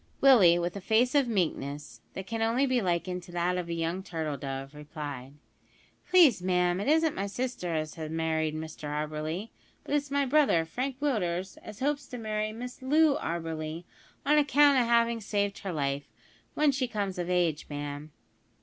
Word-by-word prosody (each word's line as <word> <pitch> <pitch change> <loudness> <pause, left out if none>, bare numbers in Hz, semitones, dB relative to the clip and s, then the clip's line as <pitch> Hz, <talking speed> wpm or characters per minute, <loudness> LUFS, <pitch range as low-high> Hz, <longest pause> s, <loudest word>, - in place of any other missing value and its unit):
Willie, 205 -11 +7
with 175 +1 -2
a 200 - -5
face 230 +6 +2
of 280 -3 +3
meekness, 145 - -2
that 190 - -5
can 225 +2 -4
only 230 +5 +2
be 255 -2 +1
likened 180 0 -1
to 175 - -13
that 175 +1 0
of 180 -2 -3
a - - -2
young 165 +3 -2
turtle 160 -6 -4
dove, 135 0 -6
replied: 145 -3 -7 0.8
"Please, 330 - +6
ma'am, 180 0 +1
it 200 - -3
isn't 320 +1 +3
my 195 +1 -3
sister 205 -6 -3
as 155 -1 -2
has 160 -2 -6
married 160 -1 -1
Mr 155 -1 -7
Auberly; 155 +6 -3 0.3
but - - -5
it's 290 -1 0
my 280 0 +1
brother, 270 - +3
Frank 255 +9 -4
Willders, 190 -9 -1
as 215 +2 -11
hopes 285 0 -1
to 250 - -7
marry 215 -1 -2
Miss 245 +4 -8
Loo 295 +2 +4
Auberly, 165 -1 -4 0.4
on 300 +2 +5
account 285 -1 +5
o' 245 - +2
havin' 235 0 +2
saved 205 -1 -1
her 195 - -4
life, 140 -3 -2 0.5
w'en 300 -1 +4
she 265 -1 -1
comes 200 -5 -3
of 175 0 -3
age, 175 -4 +1
ma'am." 145 +1 -6
185 Hz, 180 wpm, -29 LUFS, 160-250 Hz, 0.8 s, Willie